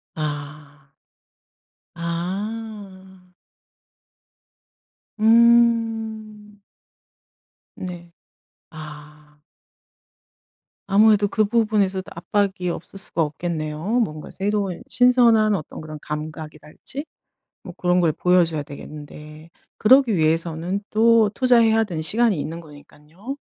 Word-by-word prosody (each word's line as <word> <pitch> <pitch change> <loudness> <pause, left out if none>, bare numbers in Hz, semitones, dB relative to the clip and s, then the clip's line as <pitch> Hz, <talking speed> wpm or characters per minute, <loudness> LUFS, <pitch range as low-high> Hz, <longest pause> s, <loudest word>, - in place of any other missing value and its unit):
아. 150 -1 -7 1.1
아. 190 +2 -6 1.9
음. 225 -2 +2 1.1
네. 175 -2 -8 0.6
아. 150 -1 -13 1.5
아무래도 205 +1 +5
그 215 +2 +1
부분에서도 205 -3 +1
압박이 190 0 -1
없을 180 +3 -9
수가 170 -3 -4
없겠네요. 155 +6 -3
뭔가 150 -4 -9
새로운 200 -1 -2
신선한 245 -4 +4
어떤 170 -6 -5
그런 155 -1 -9
감각이랄지? 155 - -6 0.6
뭐 180 - -10
그런 180 0 +1
걸 165 -3 +2
보여 180 +3 +3
줘야 160 -3 -3
되겠는데 150 +2 -11 0.3
그러기 245 -1 +5
위해서는 165 +3 0
또 225 0 +4
투자해야 230 -3 +4
되는 170 -7 -5
시간이 215 +1 +1
있는 165 +3 -5
거니깐요. 155 - -11
185 Hz, 200 characters per minute, -22 LUFS, 155-220 Hz, 1.9 s, 아무래도